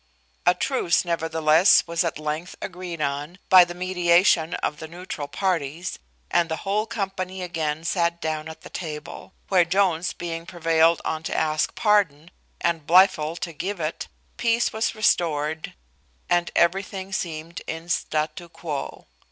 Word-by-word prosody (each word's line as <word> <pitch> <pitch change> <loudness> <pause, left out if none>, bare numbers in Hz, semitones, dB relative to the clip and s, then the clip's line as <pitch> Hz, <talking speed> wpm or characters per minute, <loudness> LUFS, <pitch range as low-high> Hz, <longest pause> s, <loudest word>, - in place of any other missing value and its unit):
A 180 - +6
truce, 180 -6 +1
nevertheless, 165 +1 +4
was 170 +1 0
at 170 - -2
length 155 +3 -4
agreed 180 -3 -6
on, 145 +4 -3
by 185 -1 +9
the 175 0 -6
mediation 175 -2 +3
of 150 - -2
the 160 - -7
neutral 170 -3 -6
parties, 170 0 -2 0.3
and 170 -1 +2
the 160 - -1
whole 210 +3 0
company 190 -4 -4
again 160 -3 -2
sat 170 -1 0
down 155 -1 -3
at 160 - -10
the - - -11
table; 155 +1 -7 0.2
where 185 -2 +5
Jones 175 -1 +1
being 165 -1 -6
prevailed 165 -2 +2
on 160 0 -2
to - - -3
ask 155 0 0
pardon, 180 -7 +2 0.3
and 165 -3 -1
Blifil 170 -3 +5
to 170 - -4
give 185 +5 -4
it, 155 0 -3 0.3
peace 235 0 +1
was 220 +1 -1
restored, 160 -7 0 0.5
and 175 0 +2
everything 190 +2 0
seemed 165 -2 -4
in 165 +1 -5
statu 155 0 -2
quo. 150 -4 -6
170 Hz, 145 wpm, -24 LUFS, 160-185 Hz, 0.5 s, by